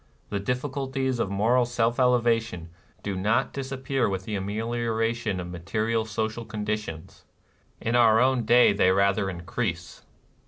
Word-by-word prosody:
The 100 - -1
diffi 125 +7 -2
culties 135 -2 -2
of 100 - 0
moral 110 +6 +2
self 120 0 0
elevation 115 -8 +1 0.3
do 100 -1 -3
not 105 +6 +1
disappear 135 -2 -2
with 95 -1 -3
the 110 - -5
amelioration 115 +1 -1
of 90 0 -6
material 110 +6 -1
social 110 +1 -3
con 110 -2 -6
ditions; 105 -7 -5 0.3
— - - -38
in 115 +2 -1
our 115 -2 +5
own 130 0 +3
day 120 -1 +5
they 100 -2 +3
rather 100 +1 +2
in 85 -2 -6
crease. 85 -1 -4
110 Hz, 155 wpm, -26 LUFS, 100-120 Hz, 0.3 s, our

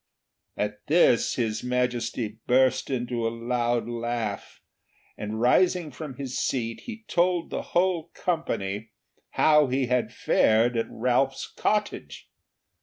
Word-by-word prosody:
At 105 0 -3
this 155 -7 +4
His 110 -3 -1
Majesty 120 -3 -1
burst 130 +1 +3
into 120 -3 -1
a - - +1
loud 120 0 -1
laugh, 115 -3 -4 0.6
and 105 +1 -5
rising 170 +6 +3
from 135 +1 -8
his 130 -1 -4
seat 115 -3 -1
he 225 -2 -8
told 175 -1 +1
the - - -2 0.2
whole 175 -2 +1
company 110 - -2 0.5
how 150 -2 +5
he 130 +1 0
had 125 0 0
fared 115 +3 +3
at 115 - 0
Ralph's 125 +3 0
cottage. 210 0 -2
125 Hz, 120 wpm, -26 LUFS, 115-150 Hz, 0.6 s, how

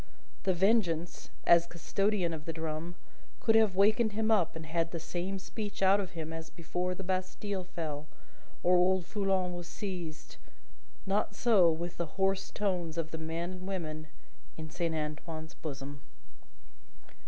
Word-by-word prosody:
The 190 - +4
Vengeance, 175 -4 +2 0.2
as 170 0 +7
custodian 185 +1 0
of 155 -1 -6
the 165 - -3
drum, 160 +2 -4 0.4
could 225 - +3
have 220 -4 +5
wakened 215 +3 +4
him 220 +1 +1
up 185 -8 +3
and 160 0 -6
had 165 +1 0
the 170 - -4
same 180 +4 -3
speech 205 +1 -4
out 195 +1 +6
of 190 -2 -4
him 160 -1 -4
as 165 0 -6
before 180 +2 -2
the 195 - -6
Bastille 185 +1 -2
fell, 155 -4 -4 0.6
or 180 +1 +6
old 180 0 +4
Foulon 190 -3 +1
was 175 -1 -6
seized; 175 -5 -6 0.7
not 205 +1 +1
so 205 -8 +5
with 170 +2 -4
the 170 +1 -4
hoarse 195 0 +2
tones 180 -5 -1
of 160 -1 -2
the 160 - -4
men 165 +2 -3
and 185 0 -7
women 155 -5 -4 0.5
in 155 -1 -7
Saint 170 -1 -1
Antoine's 155 +1 -4
bosom. 140 -2 -6
175 Hz, 155 wpm, -32 LUFS, 160-195 Hz, 0.7 s, as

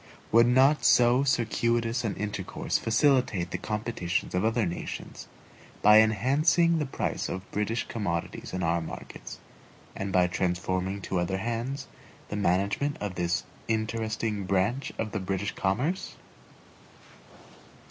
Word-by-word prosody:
Would 115 +1 +6
not 135 +4 +4
so 125 +2 +5
circuitous 115 -1 +1
an 110 -4 -2
intercourse 105 -1 -2
facilitate 115 - +2
the 90 - -3
competitions 105 -5 -2
of 90 +2 +1
other 115 0 +2
nations, 85 0 -6 0.6
by 105 +1 +8
enhancing 150 - +3
the 150 - -1
price - - -2
of 95 +1 -6
British 105 +3 -1
commodities 85 -7 -3
in 95 -1 -3
our 85 +1 +1
markets, 80 - -8 0.6
and 95 0 -3
by 90 -1 +4
transferring 90 +2 -1
to 95 - -1
other 90 +2 -1
hands 120 +6 -3 0.4
the - - -4
management 100 +9 0
of 105 -2 -3
this 90 0 -1 0.2
interesting 110 -2 -1
branch 100 +8 0
of 110 -1 -3
the 110 - -2
British 95 +2 -2
commerce? 125 - -1
110 Hz, 125 wpm, -28 LUFS, 95-120 Hz, 0.6 s, by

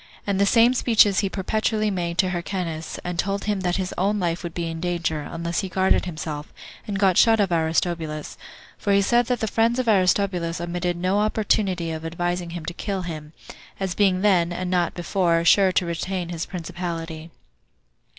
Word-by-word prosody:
And 200 -1 0
the 200 - +4
same 235 +3 +5
speeches 220 -5 +4
he 200 - 0
perpetually 215 +2 0
made 170 -2 -3
to 185 0 +2
Hyrcanus; 170 -3 -4
and 175 -1 -4
told 200 +2 -1
him 205 -1 -1
that 180 -1 0
his 185 -1 -2
own 205 +3 +1
life 175 -2 -1
would 170 -2 -7
be 170 - -2
in 165 0 -4
danger, 170 -3 -1
unless 170 +1 -2
he 190 - -3
guarded 190 +1 +2
himself, 155 -3 -5 0.4
and 205 -2 -2
got 195 -2 +4
shut 225 -1 +5
of 195 -3 +2
Aristobulus; 160 -1 -1 0.4
for 200 - +1
he 200 - +5
said 240 +3 +3
that 250 -2 -1
the 220 - 0
friends 230 +3 +2
of 255 -2 -1
Aristobulus 185 -4 +2
omitted 175 0 -2
no 185 +3 +1
opportunity 200 -5 0
of 160 0 -5
advising 175 +1 -2
him 170 -1 -6
to 170 - -4
kill 195 +1 -3
him, 155 -3 -7 0.5
as 190 -2 -2
being 190 -2 +2
then, 180 -4 +3
and 180 +1 -3
not 175 -2 +1
before, 175 -2 +1
sure 190 +2 +5
to 180 - +2
retain 175 +1 -3
his 170 -2 -4
principality. 170 -2 -5
180 Hz, 190 wpm, -23 LUFS, 170-200 Hz, 0.5 s, same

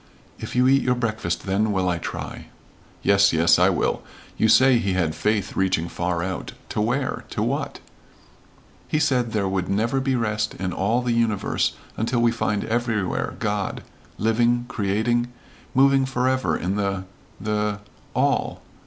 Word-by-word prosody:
"If - - -6
you 125 +1 +4
eat 135 +1 +5
your 125 -1 +1
breakfast, 110 -7 -2
then 100 +3 +1
will 95 -2 0
I 90 -2 0
try." - - -6 0.6
"Yes, 100 -1 +4
yes, 85 +1 +4
I - - +5
will. - - 0 0.3
You 110 - +2
say 130 +2 +6
he 100 -4 0
had 85 -4 0
faith 105 +1 -1
reaching 95 -3 +1
far 85 0 -2
out 95 0 -4 0.2
to - - -1
where 125 +5 -1
to - - -2
what?" - - -2 1.1
"He - - 0
said 130 -6 +1
there 100 -3 0
would 95 -1 -2
never 115 +7 +1
be 135 0 0
rest 105 -3 -1
in 95 -1 -3
all 115 +6 +1
the 120 -1 0
universe 115 -3 0 0.2
until 115 +2 0
we 120 0 +4
find 105 -3 -1
everywhere 115 -4 -1
God, - - -2 0.3
living 120 +3 +2
creating 120 +2 0 0.4
moving 135 0 +4
forever 130 0 +1
in 95 +3 -2
the 100 -2 -1 0.4
the 105 0 -1 0.4
all." - - 0
110 Hz, 155 wpm, -23 LUFS, 95-120 Hz, 1.1 s, say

